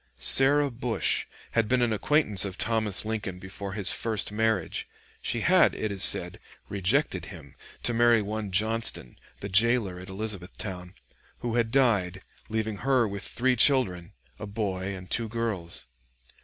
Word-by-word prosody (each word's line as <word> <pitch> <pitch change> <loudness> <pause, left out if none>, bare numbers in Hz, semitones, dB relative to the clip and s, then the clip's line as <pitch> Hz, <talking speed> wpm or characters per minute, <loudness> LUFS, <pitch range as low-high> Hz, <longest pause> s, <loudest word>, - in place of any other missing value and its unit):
Sarah 140 +1 +4
Bush 120 -1 -1 0.2
had 115 -2 +1
been 125 +2 +2
an 115 -2 +1
acquaintance 110 - +3
of 95 -2 -5
Thomas 110 -3 0
Lincoln 105 -4 -4
before 95 +1 -7
his 100 -3 +4
first 110 -2 -2
marriage; 110 -4 -1 0.3
she - - -2
had, - - +4
it 110 - -3
is 100 -2 -1
said, - - +3 0.3
rejected 95 -2 0
him - - -12 0.3
to 120 - -1
marry 120 0 +4
one 105 0 -4
Johnston, 110 - +1 0.3
the 100 - -4
jailer 105 -2 +2
at 90 +1 -10
Elizabethtown, 95 -2 -6 0.5
who 120 -1 -3
had 115 -1 +1
died, 100 -8 +1 0.3
leaving 110 -1 -2
her 130 0 +2
with 100 -1 -6
three 125 +5 0
children, 110 -10 +3 0.3
a 105 - -6
boy 100 -2 -3
and 90 -1 -10
two 115 -1 0
girls. 105 - -3
110 Hz, 150 wpm, -27 LUFS, 95-115 Hz, 0.5 s, Sarah